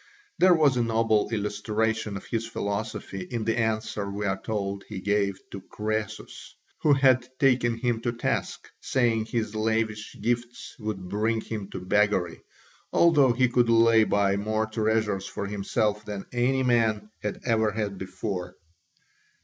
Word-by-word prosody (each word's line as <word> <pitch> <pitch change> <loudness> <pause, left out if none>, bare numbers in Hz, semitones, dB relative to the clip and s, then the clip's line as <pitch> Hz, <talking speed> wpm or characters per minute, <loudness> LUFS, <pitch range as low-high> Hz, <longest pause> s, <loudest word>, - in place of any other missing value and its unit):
There 180 -1 +6
was 145 -5 +3
a - - +2
noble 115 -2 +2
illustration 105 0 -1
of - - -10
his 115 -1 -2
philosophy 100 -2 -4
in 110 +4 -4
the 115 +1 +1
answer 110 -2 -1
we 100 +1 -3
are 95 -1 -1
told 100 -2 -3
he 105 -3 -5
gave 100 -1 0
to 100 - -7
Croesus, 110 +2 -5 0.3
who 150 - +5
had 130 -2 +3
taken 125 -4 +3
him 115 -1 -1
to 120 - 0
task, 115 - -2
saying 115 -4 +1
his 110 -2 -2
lavish 110 -1 -1
gifts 120 +2 -3
would 105 -4 -4
bring 110 +4 0
him 105 -3 -6
to 95 - -6
beggary, 100 -3 +1 0.5
although 150 -7 +5
he 125 +2 +3
could 120 -1 +2
lay 115 -1 +6
by 100 -1 +2
more 110 +2 0
treasures 110 -3 0
for 100 - -5
himself 105 +1 -1
than 105 -2 -6
any 130 +2 +1
man 110 -4 +1
had 105 - -3
ever 110 -3 +2
had 105 -2 -3
before. 90 -2 -5
110 Hz, 150 wpm, -26 LUFS, 105-115 Hz, 0.5 s, There